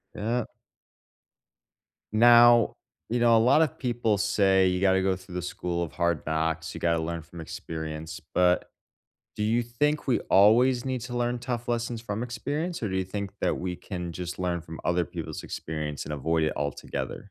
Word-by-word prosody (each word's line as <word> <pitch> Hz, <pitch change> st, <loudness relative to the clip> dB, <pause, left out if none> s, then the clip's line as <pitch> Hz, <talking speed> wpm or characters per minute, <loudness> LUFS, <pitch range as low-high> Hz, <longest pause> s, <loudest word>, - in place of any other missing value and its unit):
Yep. 115 Hz, +3 st, -2 dB, 1.6 s
Now, 120 Hz, 0 st, +6 dB, 0.3 s
you 120 Hz, +1 st, 0 dB
know, 115 Hz, -1 st, +5 dB
a -, -, +6 dB
lot 135 Hz, +7 st, +5 dB
of 155 Hz, -, -1 dB
people 120 Hz, -5 st, 0 dB
say 95 Hz, -2 st, +3 dB
you 90 Hz, 0 st, +1 dB
gotta 95 Hz, -1 st, +3 dB
go 95 Hz, -1 st, +1 dB
through 95 Hz, -1 st, -12 dB
the 90 Hz, -, -2 dB
school 85 Hz, -1 st, -3 dB
of 85 Hz, -, -4 dB
hard 85 Hz, -3 st, 0 dB
knocks, 80 Hz, +1 st, -1 dB
you -, -, -7 dB
gotta 85 Hz, -1 st, +1 dB
learn 85 Hz, 0 st, -3 dB
from 85 Hz, +1 st, -11 dB
experience, 80 Hz, +1 st, -6 dB
but 90 Hz, 0 st, +3 dB, 0.7 s
do 105 Hz, -, -2 dB
you 115 Hz, +3 st, +2 dB
think 145 Hz, +6 st, -1 dB
we 125 Hz, -, +3 dB
always 120 Hz, +5 st, +5 dB
need 130 Hz, -2 st, -2 dB
to 125 Hz, 0 st, -6 dB
learn 120 Hz, 0 st, 0 dB
tough 120 Hz, -1 st, -4 dB
lessons 120 Hz, -1 st, -2 dB
from 110 Hz, 0 st, -3 dB
experience, 145 Hz, +6 st, -3 dB
or 105 Hz, -, -1 dB
do 95 Hz, -, -1 dB
you 95 Hz, -, -1 dB
think 100 Hz, 0 st, -4 dB
that -, -, 0 dB
we 90 Hz, -1 st, -3 dB
can 90 Hz, -3 st, -6 dB
just 90 Hz, +1 st, -5 dB
learn 90 Hz, -2 st, -1 dB
from 80 Hz, -1 st, -9 dB
other 85 Hz, -1 st, +1 dB
people's -, -, -6 dB
experience 75 Hz, -2 st, -4 dB
and 75 Hz, -, -4 dB
avoid 80 Hz, +3 st, 0 dB
it 75 Hz, -, 0 dB
altogether? 70 Hz, -2 st, -4 dB
95 Hz, 185 wpm, -27 LUFS, 85-120 Hz, 1.6 s, Now